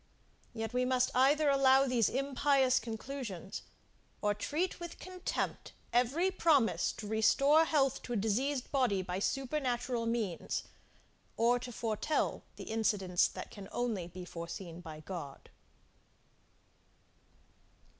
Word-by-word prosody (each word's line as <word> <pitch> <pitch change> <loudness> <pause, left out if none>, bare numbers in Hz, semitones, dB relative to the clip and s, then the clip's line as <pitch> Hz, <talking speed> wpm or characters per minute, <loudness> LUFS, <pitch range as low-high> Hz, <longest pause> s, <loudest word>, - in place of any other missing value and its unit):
Yet 225 0 -4
we 250 0 +2
must 255 0 +2
either 285 +4 +4
allow 275 -1 +5
these 245 -5 +2
impious 275 0 +2
conclusions, 225 -4 -6 0.6
or 210 -1 +1
treat 305 - -2
with 345 -1 -7
contempt 370 0 -4 0.2
every 270 +10 +2
promise 310 -10 +3
to 210 - -7
restore 275 +9 +4
health 275 -4 +2
to 245 - -5
a - - 0
diseased 245 +6 0
body 245 -9 +2
by 180 +1 -3
supernatural 250 -1 -1
means, 220 -7 -2 0.7
or 240 +2 +3
to 245 0 -7
foretell, 230 +6 -1
the - - -8
incidents 205 -5 +1
that - - -8
can 200 -1 -10
only 220 -8 -2
be 180 +1 -9
foreseen 170 0 -7
by 155 -3 -9
God. 155 -5 -8
245 Hz, 120 wpm, -33 LUFS, 205-275 Hz, 0.7 s, allow